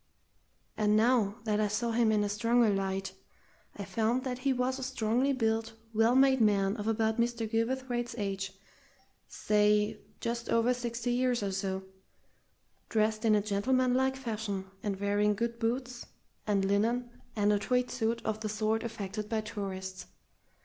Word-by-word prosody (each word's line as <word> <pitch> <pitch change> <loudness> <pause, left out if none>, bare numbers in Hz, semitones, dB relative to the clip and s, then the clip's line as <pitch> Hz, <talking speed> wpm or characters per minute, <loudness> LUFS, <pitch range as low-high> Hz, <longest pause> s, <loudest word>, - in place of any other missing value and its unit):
And 210 0 +3
now 220 -3 +3
that 215 -2 0
I 215 - +2
saw 215 +3 -1
him 230 -1 +3
in 210 -1 +2
a - - 0
stronger 230 +1 +3
light, 195 -1 -2 0.6
I - - -5
found 230 +3 0
that 250 -1 -3
he 270 +1 +1
was 255 +1 0
a - - -5
strongly 255 +1 +1
built, 225 -3 0 0.2
well 225 +3 +3
made 265 -1 +5
man 200 -2 +3
of 210 0 -4
about 220 0 +1
Mr. 235 -1 0
Gilverthwaite's 240 +1 -1
age 195 -2 -3 0.8
say, 210 0 +2 0.2
just 235 0 -3
over 230 +2 +3
sixty 240 0 -3
years 245 -2 +1
or 200 - -1
so, 190 0 -2 1.1
dressed 215 0 +1
in 215 -1 +5
a 205 - +2
gentlemanlike 255 +5 +1
fashion, 215 -6 -4 0.2
and 200 -2 -3
wearing 205 +1 +2
good 235 +2 -2
boots 245 +1 -2 0.4
and 200 -2 +2
linen 230 +5 +1 0.2
and 210 -1 +3
a 205 - +2
tweed 250 +3 0
suit 230 -1 -1
of 220 0 -1
the 215 -1 -3
sort 215 +1 0
affected 210 -2 -5
by 220 -1 0
tourists. 190 -4 -6
220 Hz, 155 wpm, -30 LUFS, 210-240 Hz, 1.1 s, made